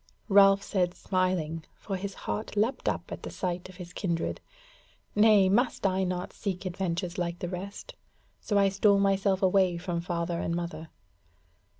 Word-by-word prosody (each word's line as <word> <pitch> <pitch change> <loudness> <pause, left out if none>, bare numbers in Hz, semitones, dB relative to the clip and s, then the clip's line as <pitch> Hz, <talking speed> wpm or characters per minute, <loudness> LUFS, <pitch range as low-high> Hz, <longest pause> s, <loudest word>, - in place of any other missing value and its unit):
Ralph 195 0 +6
said 180 -4 0
smiling, 180 -4 -1
for 195 - -5
his 195 +1 -5
heart 215 0 -4
leapt 225 +6 +1
up - - -4
at - - -6
the - - -6
sight 180 -1 -3
of 185 - -13
his 180 -1 -9
kindred: 170 -4 -2 0.7
"Nay, 210 -2 +6
must 235 +3 +1
I 190 0 +2
not 180 0 -3
seek 195 -2 -4
adventures 180 -1 -2
like 170 -1 -2
the 175 - -4
rest? 190 +3 -7 0.5
So 205 - 0
I 200 -1 +5
stole 200 +1 +4
myself 195 -1 +2
away 185 -2 +3
from 170 -1 -3
father 170 -1 -2
and 170 - -1
mother." 170 -2 -5
185 Hz, 165 wpm, -28 LUFS, 175-195 Hz, 0.7 s, Ralph